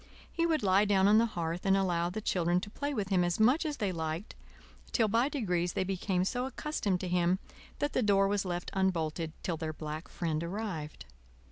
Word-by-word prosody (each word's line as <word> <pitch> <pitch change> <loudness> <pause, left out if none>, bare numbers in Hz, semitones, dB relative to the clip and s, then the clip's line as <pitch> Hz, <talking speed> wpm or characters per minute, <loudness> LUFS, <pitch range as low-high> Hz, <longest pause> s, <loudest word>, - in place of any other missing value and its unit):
He 335 0 +1
would 315 -6 +1
lie 195 +1 +4
down 195 -1 +4
on 215 +2 +6
the 230 - +3
hearth 170 -4 -3
and 195 0 +4
allow 175 -3 +1
the 215 +5 -4
children 175 -3 +1
to 205 - -7
play 285 +5 -3
with 210 -8 -2
him 185 -3 +3
as 175 +2 0
much 260 +9 +4
as 295 -1 -3
they 200 -3 0
liked, 160 +3 -4 0.6
till 225 -3 +3
by 230 +6 +2
degrees 180 - -1
they - - 0
became 185 -1 -1
so 245 +5 -1
accustomed 250 -9 -2
to 185 - -3
him 180 0 +2 0.4
that 290 - -1
the - - +2
door 200 -3 +4
was 200 0 0
left 175 -2 -4
unbolted 165 -4 0
till 170 -3 -1
their 155 0 -3
black 155 +1 -6
friend 160 -2 -2
arrived. 170 -5 -5
190 Hz, 210 wpm, -31 LUFS, 170-215 Hz, 0.6 s, on